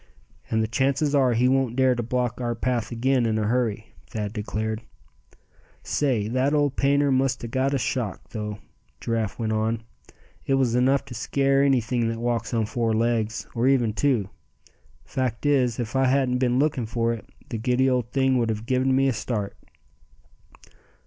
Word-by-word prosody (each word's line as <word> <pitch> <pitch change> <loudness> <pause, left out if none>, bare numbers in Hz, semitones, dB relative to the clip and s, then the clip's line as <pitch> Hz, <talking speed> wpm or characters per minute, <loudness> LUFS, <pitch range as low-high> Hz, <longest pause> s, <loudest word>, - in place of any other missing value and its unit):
"And 110 0 +1
the - - -1
chances 135 +5 +1
are, 130 -4 +4
he 120 +2 +3
won't 130 -2 +1
dare 130 -1 +4
to 120 - -2
block 125 +1 -2
our 120 -1 -1
path 120 0 -1
again 125 +1 +1
in 110 -1 0
a 110 - 0
hurry," 110 -1 -1
Thad 105 -2 -4
declared. 110 0 -3 1.0
"Say, 125 -8 0
that 130 +5 +1
old 145 -2 +1
painter 140 +1 +2
must 130 -1 +1
a - - -3
got 130 +4 0
a - - +2
shock, 115 -3 -2
though," 105 -2 -4 0.4
Giraffe 115 -3 -2
went 110 -2 -1
on. 110 +1 -1 0.6
"It 135 - +1
was 130 -3 +2
enough 130 +3 +2
to - - -9
scare 135 +4 +1
anything 125 -4 +2
that 115 - -3
walks 115 -1 -1
on 115 -2 +1
four 115 +1 -1
legs, 110 -1 0
or 120 +2 +1
even 125 -5 +3
two. 110 -5 +1 0.7
Fact 130 -1 -3
is, 130 -5 +2
if 120 +1 -4
I 135 0 +3
hadn't 130 -1 +2
been 125 -1 +2
looking 135 -5 +1
for 115 +1 0
it, 115 - -7 0.3
the 115 - -3
giddy 125 +3 +2
old 125 -3 0
thing 130 -1 +2
would 115 -1 0
a 110 - +1
given 130 +4 0
me 135 +1 +3
a 135 - +2
start." 105 -3 -3
120 Hz, 180 wpm, -25 LUFS, 115-130 Hz, 1.0 s, are